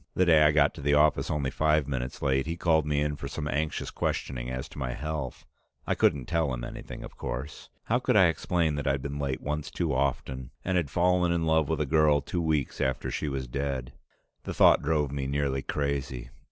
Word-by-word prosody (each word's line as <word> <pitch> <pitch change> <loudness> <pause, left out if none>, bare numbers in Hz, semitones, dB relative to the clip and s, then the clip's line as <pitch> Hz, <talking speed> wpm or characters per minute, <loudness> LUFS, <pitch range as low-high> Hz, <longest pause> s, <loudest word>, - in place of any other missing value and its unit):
The 95 - +3
day 80 -3 +6
I 75 0 +6
got 75 -1 +3
to 80 - -9
the 70 +1 +2
office 75 +1 +3
only 70 -3 -1
five 75 -2 +2
minutes 65 -2 -4
late, 65 0 +1
he 85 +1 -3
called 80 -3 +2
me 75 -1 +1
in 75 0 0
for 70 - -6
some 75 +1 -4
anxious 75 +3 -2
questioning 60 -2 -2
as 65 +2 -4
to 80 - -10
my 60 -2 -2
health. 75 -3 -5 0.4
I - - +1
couldn't 70 -4 +2
tell 80 -2 0
him - - -4
anything, - - -7
of - - -11
course. 65 +4 -6
How - - +1
could - - +1
I - - +7
explain 85 -4 +1
that 70 - -3
I'd 70 -1 0
been 70 0 -4
late 70 -2 -2
once 75 0 -3
too - - -1
often, 65 -1 -1 0.2
and 95 - 0
had 85 -6 +1
fallen 90 +2 +2
in 85 -1 0
love 80 -2 +2
with 80 -2 0
a - - +1
girl 75 0 +4
two 85 +5 -3
weeks 75 -5 -1
after 65 0 -1
she 75 - -2
was 70 -1 -3
dead? 65 -1 -3 0.5
The - - -6
thought - - +6
drove 75 -2 0
me 70 -1 -3
nearly 70 -1 0
crazy. 65 -4 -3
70 Hz, 220 wpm, -28 LUFS, 65-80 Hz, 0.5 s, I